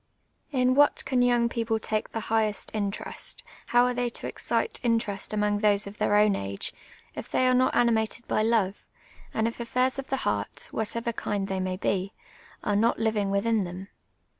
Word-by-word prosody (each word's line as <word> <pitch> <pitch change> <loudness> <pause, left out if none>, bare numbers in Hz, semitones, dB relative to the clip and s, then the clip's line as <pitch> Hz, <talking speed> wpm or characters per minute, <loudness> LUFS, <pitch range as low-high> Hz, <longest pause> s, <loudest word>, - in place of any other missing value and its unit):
In 255 -2 +3
what 290 +2 +4
can 260 -2 +1
young 240 -1 +3
people 230 -1 -1
take 215 -1 -2
the 225 - -4
highest 215 -2 0
interest, 205 -2 -3 0.2
how 245 0 +4
are 250 - +1
they 245 0 0
to - - -5
excite 455 - -1
interest 225 -4 0
among 210 -1 +1
tliose 205 -1 +3
of 200 +1 -10
tlieir 205 0 +4
o\m 210 -2 +3
age, 100 0 -4 0.4
if - - -7
they 255 - +2
are 255 - +4
not 255 +1 +3
animated 235 0 +1
by - - +1
love, 215 -3 +1 0.5
and 220 0 0
if 230 - -5
affairs 255 +3 0
of 270 - -5
the 270 - -1
heart, - - -2
of - - -25
whatever 230 +2 -1
kind 200 -2 -2
they 190 -1 -2
may 185 0 -2
be, 195 +1 -1 0.5
are 205 - +1
not 225 +3 +3
living 215 -3 0
within 220 +3 +1
them 185 +2 -6
220 Hz, 190 wpm, -27 LUFS, 205-240 Hz, 0.5 s, what